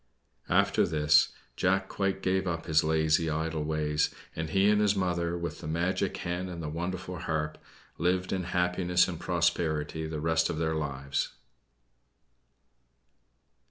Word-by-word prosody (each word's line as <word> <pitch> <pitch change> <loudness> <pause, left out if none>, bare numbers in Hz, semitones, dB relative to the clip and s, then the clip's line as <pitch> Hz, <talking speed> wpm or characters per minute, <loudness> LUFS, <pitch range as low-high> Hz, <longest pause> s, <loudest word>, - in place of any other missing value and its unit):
After - - +3
this, 75 -3 +4 0.3
Jack 95 +1 +1
quite 95 -1 -2
gave 95 0 +1
up 85 -1 -2
his 80 -1 +3
lazy, 80 +1 +2
idle 80 0 -1
ways, 75 0 0 0.3
and 80 0 -3
he 95 +1 +3
and 105 0 +4
his 105 -1 +3
mother, 85 -2 0
with 85 -2 -4
the - - -7
magic 95 +4 0
hen 90 0 -3
and 85 -2 -6
the 80 -2 -4
wonderful 90 +2 -4
harp, 75 -3 -2 0.4
lived 90 +1 +1
in 95 -2 -1
happiness 90 0 +2
and 85 -3 -5
prosperity 80 -3 0
the 80 -1 -4
rest 80 +1 +2
of - - -2
their 80 0 0
lives. 70 -3 -2
85 Hz, 145 wpm, -29 LUFS, 80-90 Hz, 0.4 s, this